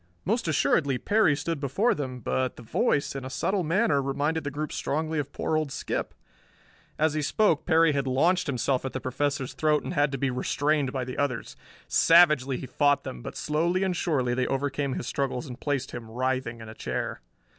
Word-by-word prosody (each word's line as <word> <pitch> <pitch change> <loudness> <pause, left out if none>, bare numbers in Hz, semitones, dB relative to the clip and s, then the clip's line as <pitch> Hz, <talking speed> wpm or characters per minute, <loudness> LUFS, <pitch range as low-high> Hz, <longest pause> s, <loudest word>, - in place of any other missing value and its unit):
Most 225 +1 0
assuredly 140 -3 +2
Perry 205 - +3
stood 150 +2 -3
before 145 - +1
them, 130 -4 -5
but 130 +2 -1
the 120 - -11
voice, 155 - 0
in 135 - -4
a 130 - -5
subtle 185 +8 0
manner, 160 -3 +2
reminded 145 +4 -1
the 145 - -2
group 150 +1 -4
strongly 155 +1 -1
of 140 -1 -4
poor 160 - -1
old 155 -3 0
Skip. - - -3 0.8
As 155 0 +2
he 155 - -1
spoke 165 +1 +2
Perry 165 -2 +5
had 140 -2 -1
launched 170 +8 +2
himself 130 -1 0
at 135 - -4
the 130 - -2
Professor's 135 +1 -2
throat 150 +2 +1
and - - -4
had 145 -1 +2
to 135 - -2
be 135 0 0
restrained 145 +2 0
by 130 -1 -2
the 125 0 -6
others. 135 -5 -2 0.3
Savagely 150 -6 +5
he - - -6
fought 145 +1 +2
them 60 - -7
but - - -7
slowly 170 +5 0
and 185 -2 0
surely 135 -8 0
they 125 0 0
overcame 140 0 -1
his - - -4
struggles 135 0 -2
and 125 -2 -8
placed 140 -3 -1
him, 120 -2 -7
writhing, 125 -1 -2
in 110 - -9
a 110 - -8
chair. - - -4
145 Hz, 200 wpm, -27 LUFS, 130-155 Hz, 0.8 s, Perry